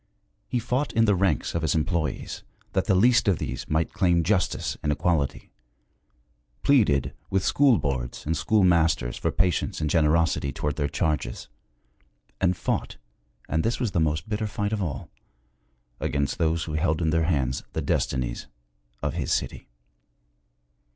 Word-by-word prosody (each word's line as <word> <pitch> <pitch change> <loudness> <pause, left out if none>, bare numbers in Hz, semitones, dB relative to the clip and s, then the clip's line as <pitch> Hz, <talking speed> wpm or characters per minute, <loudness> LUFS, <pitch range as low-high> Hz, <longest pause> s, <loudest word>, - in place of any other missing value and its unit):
He 125 - -1
fought 125 +4 -1
in 115 0 +4
the 105 - +4
ranks 95 -6 +1
of 85 - -1
his 80 -2 +1
employees, 80 -2 -2 0.3
that 95 - +1
the 95 - +3
least 120 +4 +4
of 95 -5 +3
these - - -5
might 80 +1 0
claim 90 -3 +2
justice 90 +2 0
and 75 - 0
equality; 75 -2 -1 1.1
pleaded 105 - +3 0.2
with 95 -1 0
school 135 -5 +4
boards 65 -6 -3
and 80 +2 0
schoolmasters 80 - +2
for - - -1
patience 90 -4 0
and 75 -2 -1
generosity 80 -3 +2
toward 70 +1 -3
their 70 -2 0
charges; 75 -4 -2 0.9
and 90 -1 +2
fought - - -2 0.5
and 80 - 0
this 115 +2 0
was 120 -5 -1
the 85 - 0
most 75 -1 0
bitter 110 0 -2
fight 105 +1 -2
of 105 - -1
all 70 -7 -4 0.9
against 70 -1 -1
those 80 0 +1
who 80 - -6
held 80 0 +1
in 80 -2 +1
their 80 0 +2
hands 70 -6 0
the - - -1
destinies - - -1 0.6
of - - -1
his - - -3
city. - - -2
80 Hz, 155 wpm, -25 LUFS, 75-95 Hz, 1.1 s, in